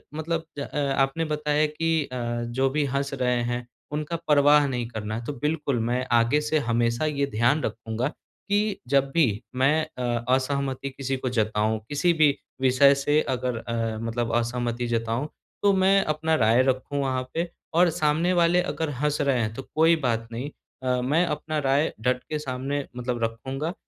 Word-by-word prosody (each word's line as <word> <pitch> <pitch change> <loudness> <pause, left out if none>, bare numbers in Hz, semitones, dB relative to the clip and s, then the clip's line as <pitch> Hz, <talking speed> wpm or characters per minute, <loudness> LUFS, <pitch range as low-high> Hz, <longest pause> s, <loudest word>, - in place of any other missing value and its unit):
मतलब 165 +1 -2
ज - - -3
अ, 140 - -5 0.2
आपने 135 +5 +1
बताया 150 0 +1
कि 160 +1 0
अ, 130 - -4 0.3
जो 130 +3 0
भी 145 +2 0
हँस 140 +1 -2
रहे 125 -2 +1
हैं 120 0 -3 0.2
उनका 150 +2 -3
परवाह 145 0 +5
नहीं 125 -3 -2
करना 110 -2 -4
है। 115 +1 -5
तो 145 - -3
बिल्कुल, 150 -1 -1
मैं 120 +3 -1
आगे 120 +5 +3
से 150 +1 0
हमेशा 120 +3 +1
ये 140 -2 0
ध्यान 120 +4 +2
रखूँगा 115 +2 -2 0.4
कि 205 0 +1
जब 135 +1 +2
भी 165 +1 +4 0.3
मैं 140 +5 +3 0.2
अ, 120 -2 -1
असहमति 140 0 -2
किसी 135 0 -3
को 130 0 -3
जताऊँ, 110 -2 0
किसी 145 +4 +2
भी 155 -3 +3 0.2
विषय 135 +2 +5
से 145 +2 +2
अगर 125 -2 -1
अ, 115 -1 -3
मतलब 115 0 -2
असहमति 120 0 -1
जताऊँ 115 +4 -1 0.3
तो 200 - +5
मैं 195 +1 +4
अपना 155 +1 0
राय 115 -1 +4
रखूँ 130 +2 -1
वहाँ 130 -2 -1
पे। 170 +1 -1 0.3
और 175 +1 +5
सामने 155 +2 +1
वाले 175 0 +4
अगर 160 -3 -2
हँस 150 0 +1
रहे 140 -3 +2
हैं 110 -1 -2
तो 135 - -6
कोई 165 +2 +5
बात 115 -1 -1
नहीं, 125 +5 -4 0.3
अ, 125 -1 +1
मैं 150 +8 +2
अपना 155 0 -3
राय 140 +2 +1
डट 125 +1 0
के 155 - -2
सामने 135 0 -3
मतलब 120 -1 -2
रखूँगा। 130 +8 -3
135 Hz, 180 wpm, -25 LUFS, 120-150 Hz, 0.4 s, परवाह